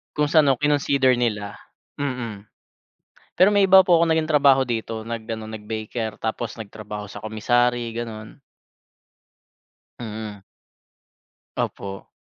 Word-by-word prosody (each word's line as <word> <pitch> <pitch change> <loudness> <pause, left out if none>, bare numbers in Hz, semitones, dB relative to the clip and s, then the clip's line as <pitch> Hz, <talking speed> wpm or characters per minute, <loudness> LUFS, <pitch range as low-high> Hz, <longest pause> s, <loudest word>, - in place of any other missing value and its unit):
Kung 150 0 +1
sa 155 -1 +5
nu 135 - +5
kinonsider 140 -3 +3
nila, 105 -4 -2 0.4
mm, 120 -7 -4 0.9
pero 190 +4 +5
may 200 -1 +4
iba 190 0 +8
po 170 -2 +5
ako 170 - +3
naging 160 -1 +2
trabaho 140 -3 +4
dito 115 -2 -4
nag 115 0 -4
ano, 110 -1 -4
nag 110 -1 -8
baker 110 0 -4
tapos 110 +1 -4
nagtrabaho 105 -1 -7
sa 100 - -10
commissary, 120 +2 0
ganun. 115 +1 -7 1.6
Mm. 110 -3 -7 1.1
Opo. 95 0 -4
115 Hz, 125 wpm, -23 LUFS, 110-140 Hz, 1.6 s, iba